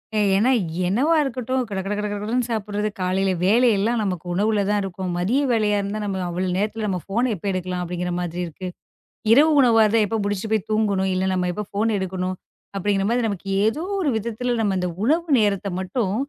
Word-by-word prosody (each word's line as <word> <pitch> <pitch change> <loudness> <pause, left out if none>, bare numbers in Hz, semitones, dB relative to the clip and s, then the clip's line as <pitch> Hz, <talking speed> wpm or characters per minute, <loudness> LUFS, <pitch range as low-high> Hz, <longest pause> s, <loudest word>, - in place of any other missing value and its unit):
ஏ - - +2 0.2
ஏன்னா 245 +6 +3 0.4
என்னவா 275 - +2
இருக்கட்டும். 255 0 -2
கடகட 195 +1 -3
கடகடன்னு 210 +4 -2
சாப்பிடறது 210 -1 -2
காலையில 190 +1 +1
வேலையெல்லாம் 225 +1 +3
நமக்கு 180 -4 -3
உணவுல 205 +2 +1
தான் 205 -1 +2
இருக்கும். 185 -1 -4
மதிய 225 +11 +1
வேலையா 210 -2 +2
இருந்தா, 200 +2 -3
நம்ம 190 -2 -2
அவ்ளோ 180 +2 -2
நேரத்துல 215 +2 -1
நம்ம 185 -2 -1
போன 240 +4 +1
எப்ப 185 - -11
எடுக்கலாம் 180 -1 -3
அப்படிங்கிற 180 0 -3
மாதிரி 175 0 -3
இருக்கு. 185 +3 -7 0.7
இரவு 300 +6 +6
உணவா 230 -3 +5
இருந்தா, 215 +1 +3
எப்ப 225 +2 -2
முடிச்சிட்டு 205 +2 -2
போயி 215 -3 +2
தூங்கணும்? 200 -3 +1
இல்ல 185 +1 0
நம்ம 180 -1 0
எப்ப 210 +3 -4
போன 220 +1 +1
எடுக்கணும் 185 0 -3 0.4
அப்படிங்கற 195 0 0
மாதிரி, 240 0 +1
நமக்கு 195 -1 -5 0.2
ஏதோ 290 +10 0 0.2
ஒரு 300 -6 +1
விதத்துல 235 +3 -2
நம்ம 195 -3 +1
அந்த 180 -1 -1
உணவு 330 +6 +2
நேரத்தை 200 -1 0
மட்டும், 190 +1 -1
205 Hz, 180 wpm, -22 LUFS, 190-225 Hz, 0.7 s, இரவு